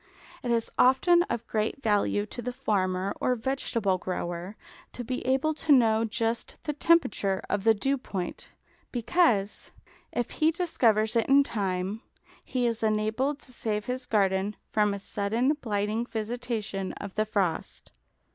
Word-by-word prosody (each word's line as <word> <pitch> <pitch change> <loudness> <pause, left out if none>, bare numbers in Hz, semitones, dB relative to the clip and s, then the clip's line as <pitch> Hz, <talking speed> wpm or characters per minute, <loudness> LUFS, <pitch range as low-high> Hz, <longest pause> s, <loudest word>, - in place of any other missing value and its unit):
It 245 - -4
is 230 -1 +1
often 345 +7 +5
of 235 0 -2
great 220 +5 -2
value 205 -1 +2
to 240 - -7
the 250 +2 -3
farmer 190 -4 0
or 250 - +2
vegetable 225 -6 -1
grower 175 +1 -4 0.4
to 245 - -5
be 255 +2 -3
able 270 +4 +2
to 310 0 -1
know 225 -4 +5
just 225 +1 -2
the 300 - -2
temperature 275 - +2
of 205 0 -1
the 225 -1 +6
dew 270 +6 0
point, 185 -7 -5 0.4
because, 235 - +1 0.4
if 240 -1 -2
he 315 0 +2
discovers 235 - +2
it 230 - +2
in 280 +1 +6
time, 195 -2 -2 0.4
he 250 -2 -1
is 230 -1 0
enabled 220 +6 0
to 255 - -14
save 210 -3 -2
his 250 0 -3
garden 195 -1 +1 0.2
from 210 -1 +2
a - - -4
sudden 220 +7 0
blighting 215 +1 -1
visitation 220 -4 -3
of 200 -2 -8
the 215 - +1
frost. 190 -6 -2
225 Hz, 150 wpm, -28 LUFS, 205-255 Hz, 0.4 s, the